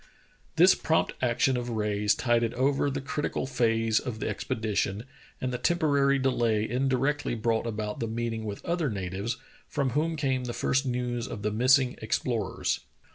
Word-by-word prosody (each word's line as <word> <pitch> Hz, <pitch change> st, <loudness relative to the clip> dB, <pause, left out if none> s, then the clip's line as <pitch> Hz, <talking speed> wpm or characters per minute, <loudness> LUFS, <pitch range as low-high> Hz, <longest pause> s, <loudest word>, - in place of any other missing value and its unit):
This 180 Hz, +3 st, +7 dB
prompt 160 Hz, -, +1 dB
action 125 Hz, +1 st, +2 dB
of 125 Hz, 0 st, -3 dB
Rae's 105 Hz, -2 st, +1 dB
tided 120 Hz, -2 st, +1 dB
over 135 Hz, +3 st, +2 dB
the 140 Hz, 0 st, -3 dB
critical 145 Hz, 0 st, -2 dB
phase 115 Hz, -3 st, +2 dB
of 120 Hz, -5 st, -5 dB
the -, -, -2 dB
expedition, 105 Hz, -1 st, -1 dB, 0.4 s
and 130 Hz, -1 st, -2 dB
the 125 Hz, -, -2 dB
temporary 140 Hz, -5 st, +3 dB
delay 115 Hz, -5 st, +1 dB
in 130 Hz, +3 st, 0 dB
directly 135 Hz, 0 st, 0 dB
brought 115 Hz, 0 st, 0 dB
about 105 Hz, -1 st, -3 dB
the 115 Hz, -, -1 dB
meeting 115 Hz, 0 st, -3 dB
with 105 Hz, -2 st, -6 dB
other 170 Hz, -4 st, 0 dB
natives, 100 Hz, +2 st, -3 dB, 0.3 s
from 140 Hz, -3 st, -1 dB
whom 160 Hz, +5 st, 0 dB
came 130 Hz, -4 st, 0 dB
the 120 Hz, -, -3 dB
first 135 Hz, +3 st, +1 dB
news 120 Hz, -1 st, -2 dB
of 105 Hz, -, -6 dB
the 105 Hz, -, 0 dB
missing 130 Hz, +3 st, +3 dB
ex 110 Hz, -, +1 dB
plorers. 115 Hz, -6 st, -1 dB
120 Hz, 170 wpm, -28 LUFS, 110-135 Hz, 0.4 s, This